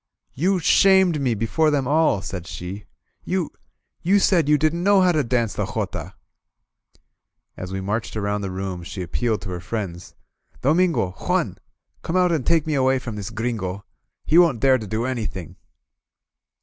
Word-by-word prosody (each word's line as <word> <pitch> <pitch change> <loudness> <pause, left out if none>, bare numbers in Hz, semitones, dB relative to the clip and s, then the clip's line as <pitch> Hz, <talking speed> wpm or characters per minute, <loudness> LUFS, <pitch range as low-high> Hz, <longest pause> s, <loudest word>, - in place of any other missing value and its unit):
"You 185 +8 +1
shamed 185 -2 +4
me 125 -4 +1
before 115 +9 +1
them 140 -4 0
all,*' 150 -9 +2
said 90 -3 -6
she. 90 +7 -7 0.4
You 180 -3 -2 0.3
— - - -48
^you 195 +4 +4
said 170 -6 +3
you 150 - +5
didn't 155 +3 0
know 200 +1 +4
how 180 -1 +4
to 155 -4 +1
dance 115 -3 0
the - - -2
jotaH - - -4 1.4
As 90 0 -7
we 95 0 -3
marched 110 +3 -3
around 105 0 -1
the 100 - -3
room, 95 -1 -4
she 90 +2 -6
appealed 110 +5 -1
to 100 - -6
her 90 - -4
friends: 90 -2 -6 0.5
"Domingo! 160 - +2
Juan! - - -2 0.4
Come 165 - -4
out 180 -1 +3
and 155 -7 -1
take 165 -3 +3
me 155 - -1
away 135 -1 +3
from 125 -4 -6
this 100 -2 -5
Gringo! 105 -4 -3 0.4
He 165 - +5
won't 165 -9 +4
dare 130 0 +4
to 110 - -7
do 110 +4 -2
any 125 -4 -2
thing!" 90 -1 -8
125 Hz, 175 wpm, -22 LUFS, 100-160 Hz, 1.4 s, you